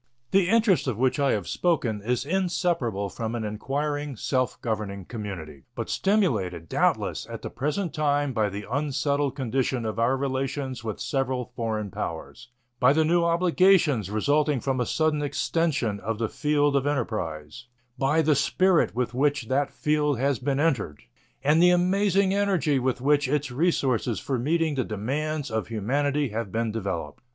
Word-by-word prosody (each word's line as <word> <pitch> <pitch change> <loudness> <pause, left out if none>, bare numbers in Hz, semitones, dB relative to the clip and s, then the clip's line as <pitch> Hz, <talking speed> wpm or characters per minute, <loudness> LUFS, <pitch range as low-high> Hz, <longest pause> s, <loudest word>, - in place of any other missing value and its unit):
The 190 -2 +3
interest 215 -8 +3
of 120 -5 -1
which 130 +2 +1
I 140 -1 +3
have 100 -5 -2
spoken 130 - 0
is 125 +5 -1
inseparable 170 - 0
from 115 +3 -4
an 115 - -3
inquiring, 145 +6 -3
self 130 +2 -1
governing 105 -4 -3
community, 90 - -7
but - - -4
stimulated, 110 - 0
doubtless, - - 0
at - - -7
the - - -5
present 150 +7 -2
time 145 -3 +1
by 110 -3 +1
the 100 +1 -6
unsettled 140 0 0
condition 130 -2 -1
of 110 0 -3
our 125 +4 +2
relations 130 -2 -3
with 110 -2 -4
several 130 -3 -2
foreign 110 -4 -2
powers, 115 +11 -6 0.3
by 125 +2 +5
the 160 +1 +3
new 170 +2 +3
obligations 170 - +3
resulting 145 +6 +1
from 130 +1 -1
a 125 - 0
sudden 155 -2 +1
extension 145 -6 0
of 110 +3 -3
the 110 -1 -1
field 145 -1 +1
of 140 0 +1
enterprise, 110 - -3 0.3
by 145 +4 +2
the 155 0 +4
spirit 180 - +2
with 125 -1 -1
which 140 -2 0
that 140 +2 +1
field 150 -2 0
has 135 -1 0
been 140 +3 -1
entered 125 - 0 0.4
and 150 +3 +4
the 180 - +7
amazing 190 +2 +3
energy 190 -9 +1
with 125 -1 -1
which 145 0 +3
its 145 -1 -1
resources 130 -6 +1
for 130 -3 -2
meeting 160 +4 +1
the 130 -2 0
demands 140 +7 -3
of 110 -1 -2
humanity 140 +6 0
have 110 -2 -4
been 115 +1 -1
developed. 95 -9 -4
135 Hz, 160 wpm, -26 LUFS, 115-150 Hz, 0.4 s, the